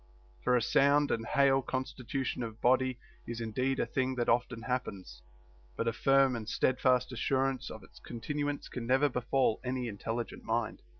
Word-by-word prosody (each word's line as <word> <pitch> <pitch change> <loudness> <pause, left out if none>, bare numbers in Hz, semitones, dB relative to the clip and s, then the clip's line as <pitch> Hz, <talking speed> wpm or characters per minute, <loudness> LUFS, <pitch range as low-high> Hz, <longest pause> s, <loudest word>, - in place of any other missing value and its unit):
For 125 0 +4
a 120 - 0
sound 145 +3 +4
and 115 +1 -1
hale 140 -2 +4
constitution 130 0 -3
of 115 -1 -5
body 130 0 +2 0.3
is 120 0 -4
indeed 125 +4 -1
a - - +2
thing 130 0 -1
that 120 -1 0
often 120 -1 +1
happens, 100 - -4 0.5
but - - -2
a 115 - +1
firm 135 +2 +4
and 110 -2 -5
steadfast 125 0 +2
assurance 130 +1 0
of 110 - -9
its - - -16
continu 145 +5 -3
ance 145 - -5
can 120 -2 -6
never 135 +3 +4
befall 125 -1 +1
any 125 -1 -2
intelligent 115 +2 -4
mind. 115 -1 -2
125 Hz, 170 wpm, -31 LUFS, 115-135 Hz, 0.5 s, For